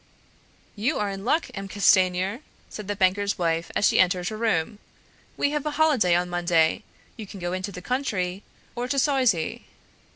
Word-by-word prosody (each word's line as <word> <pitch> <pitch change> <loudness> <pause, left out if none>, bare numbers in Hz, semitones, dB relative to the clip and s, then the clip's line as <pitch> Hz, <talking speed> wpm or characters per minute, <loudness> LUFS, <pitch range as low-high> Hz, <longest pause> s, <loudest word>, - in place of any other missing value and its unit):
"You 230 +9 0
are 205 -1 -1
in 195 0 -7
luck, 310 +7 +1
M. 195 0 -6
Castanier," 190 +1 +2 0.3
said 210 -2 -7
the 205 - -2
banker's 200 +1 +1
wife 165 -1 -1
as - - +3
he - - +2
entered 180 0 +2
her 215 - -6
room; 210 -2 -1 0.6
"we 285 - +1
have 295 -1 -2
a 295 - -3
holiday 270 - +3
on 175 +1 +1
Monday; 175 0 +1 0.4
you 215 -3 -8
can 195 - -10
go 175 0 -3
into 185 +2 -4
the 180 -1 -9
country, 200 -8 -2 0.3
or 245 +1 -3
to 275 - -2
Soizy." 255 - +1
200 Hz, 175 wpm, -25 LUFS, 180-235 Hz, 0.6 s, as